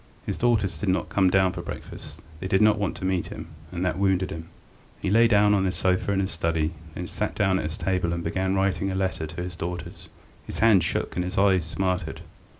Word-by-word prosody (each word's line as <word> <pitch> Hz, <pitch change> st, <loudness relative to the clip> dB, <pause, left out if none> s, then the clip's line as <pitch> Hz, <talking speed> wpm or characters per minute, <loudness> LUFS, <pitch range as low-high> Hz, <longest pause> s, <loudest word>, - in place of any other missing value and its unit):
His -, -, -3 dB
daughters 110 Hz, -5 st, +1 dB
did 100 Hz, -, -1 dB
not 95 Hz, -, 0 dB
come 95 Hz, -2 st, +3 dB
down 95 Hz, 0 st, +3 dB
to -, -, -6 dB
breakfast; -, -, -9 dB, 0.2 s
they 95 Hz, -, -4 dB
did 95 Hz, 0 st, +3 dB
not 105 Hz, -1 st, +4 dB
want 100 Hz, -, -1 dB
to -, -, -5 dB
meet 95 Hz, -2 st, 0 dB
him, -, -, -8 dB, 0.2 s
and 90 Hz, 0 st, -2 dB
that 90 Hz, -, -1 dB
wounded 95 Hz, -1 st, +1 dB
him. 80 Hz, 0 st, -7 dB, 0.5 s
He 95 Hz, -, -1 dB
lay 115 Hz, +2 st, +6 dB
down 105 Hz, -2 st, +4 dB
on 100 Hz, -2 st, +3 dB
his 95 Hz, -1 st, 0 dB
sofa 95 Hz, +1 st, +1 dB
in 100 Hz, -, +1 dB
his 95 Hz, -, -2 dB
study, 80 Hz, -1 st, 0 dB, 0.2 s
then 90 Hz, -, -4 dB
sat 105 Hz, -, -3 dB
down 95 Hz, -3 st, +2 dB
to -, -, -1 dB
his 80 Hz, +3 st, -4 dB
table 90 Hz, -1 st, 0 dB
and 85 Hz, 0 st, -2 dB
began 95 Hz, +3 st, 0 dB
writing 95 Hz, 0 st, +1 dB
a 95 Hz, -, -2 dB
letter 95 Hz, -4 st, -1 dB
to 85 Hz, +3 st, -6 dB
his 90 Hz, 0 st, -6 dB
daughters. 85 Hz, +1 st, -6 dB, 0.4 s
His -, -, -5 dB
hand 105 Hz, -5 st, +5 dB
shook -, -, -2 dB
and 90 Hz, -, 0 dB
his 90 Hz, -, -5 dB
eyes 95 Hz, -4 st, +4 dB
smarted. 90 Hz, 0 st, -2 dB
95 Hz, 235 wpm, -25 LUFS, 90-95 Hz, 0.5 s, lay